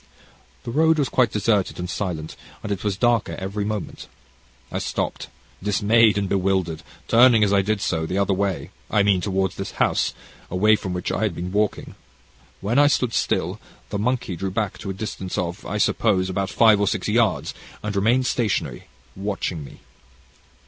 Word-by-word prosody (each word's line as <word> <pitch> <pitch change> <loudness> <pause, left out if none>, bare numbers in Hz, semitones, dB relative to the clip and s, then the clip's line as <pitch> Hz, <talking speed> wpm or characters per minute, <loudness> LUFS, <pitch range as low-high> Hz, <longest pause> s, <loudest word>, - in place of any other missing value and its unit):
"The - - -5
road 160 +4 +3
was 140 -4 +1
quite 125 -2 +2
deserted 105 -2 +1
and 90 - -4
silent, 85 -5 -4 0.3
and 105 - -4
it 100 -2 -3
was 100 -2 -1
darker 120 -2 +1
every 100 +2 -3
moment. 105 -1 -4 0.6
I - - -2
stopped - - -3 0.3
dismayed 105 +2 +3
and 100 -1 0
bewildered, 95 -4 0 0.3
turning 115 -1 +6
as 100 -1 +2
I 100 - +5
did 105 +1 -1
so, 80 -4 -1
the 90 - -2
other 100 0 +2
way 95 -2 -2 0.2
I 105 - +3
mean, 100 -3 +3
towards 95 -1 -1
this 95 0 -5
house, - - +1 0.3
away 105 +4 +4
from 95 -3 -4
which 90 - -3
I - - -2
had 105 -6 0
been 90 +2 -4
walking. 105 +1 -1 0.7
When 115 +7 +1
I 145 - +6
stood 125 -5 +1
still, - - 0 0.3
the 100 - -2
monkey 120 -4 -1
drew 95 +3 -3
back 100 +1 -2
to 100 - -6
a - - -2
distance 95 -2 -5
of, 90 +3 -3
I 105 - -2
suppose, 95 -3 +2
about 95 +1 -1
five 110 -2 +5
or 100 - +2
six 105 -2 -1
yards, 105 - +1 0.3
and 105 -1 -3
remained 115 +6 +2
stationary, 95 - -1 0.3
watching 95 -5 -3
me. - - -13
100 Hz, 180 wpm, -23 LUFS, 95-110 Hz, 0.7 s, turning